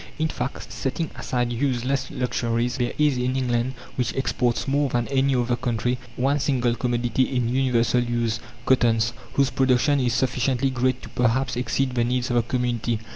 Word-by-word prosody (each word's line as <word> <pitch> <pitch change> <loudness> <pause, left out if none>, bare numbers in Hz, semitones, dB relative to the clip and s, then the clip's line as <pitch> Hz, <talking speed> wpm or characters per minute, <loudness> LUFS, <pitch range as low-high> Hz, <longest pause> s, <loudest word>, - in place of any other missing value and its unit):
In 160 0 0
fact, 125 -2 -5
setting 140 +4 -2
aside 120 -1 -1
useless 130 +1 -1
luxuries, 120 -1 -1
there 120 -1 -1
is 150 -4 +2
in 125 +1 0
England, 125 0 0 0.2
which 125 -2 -1
exports 125 -2 0
more 140 +1 +2
than 120 -1 0
any 135 0 +2
other 120 0 +1
country, 120 +1 -1 0.2
one 140 +3 +1
single 125 -3 +1
commodity 120 0 0
in 125 -2 +1
universal 125 -2 +2
use 120 -2 -1 0.3
cottons 115 -3 +3 0.2
whose 140 -2 +2
production 135 +2 +3
is 125 -2 +1
sufficiently 130 +1 +1
great 130 0 0
to - - -9
perhaps 125 +2 +1
exceed 125 +1 0
the 120 -1 +1
needs 125 +1 0
of 120 - +2
the - - +5
community. 120 -2 -1
125 Hz, 170 wpm, -24 LUFS, 120-130 Hz, 0.3 s, the